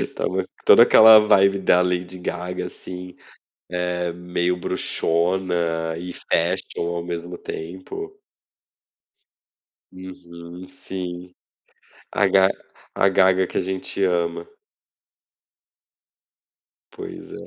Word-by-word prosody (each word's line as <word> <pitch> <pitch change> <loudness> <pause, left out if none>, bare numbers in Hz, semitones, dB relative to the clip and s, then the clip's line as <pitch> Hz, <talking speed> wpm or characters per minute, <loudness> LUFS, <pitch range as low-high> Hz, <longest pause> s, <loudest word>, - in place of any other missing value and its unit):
Então - - -4 0.4
toda - - +8
aquela 110 0 +8
vibe 100 -2 +4
da 90 -1 +3
Lady 90 0 -2
Gaga 90 0 -4
assim 90 0 -9 0.7
é 90 -1 -2
meio 90 +1 -2
bruxona 85 -2 -1
e 90 +1 -7
fashion 85 - -2
ao 85 - -4
mesmo 85 0 -6
tempo. 95 - -8 1.8
Uhum 90 -1 -11
sim. 90 -1 -8 0.8
a 100 - +2
ga 95 0 +5 0.5
a 95 - +3
Gaga 95 -1 +3
que - - -3
a - - +2
gente 95 +1 -3
ama. 85 -2 -1 2.5
Pois - - -9
é. - - -9
90 Hz, 95 wpm, -22 LUFS, 85-95 Hz, 2.5 s, toda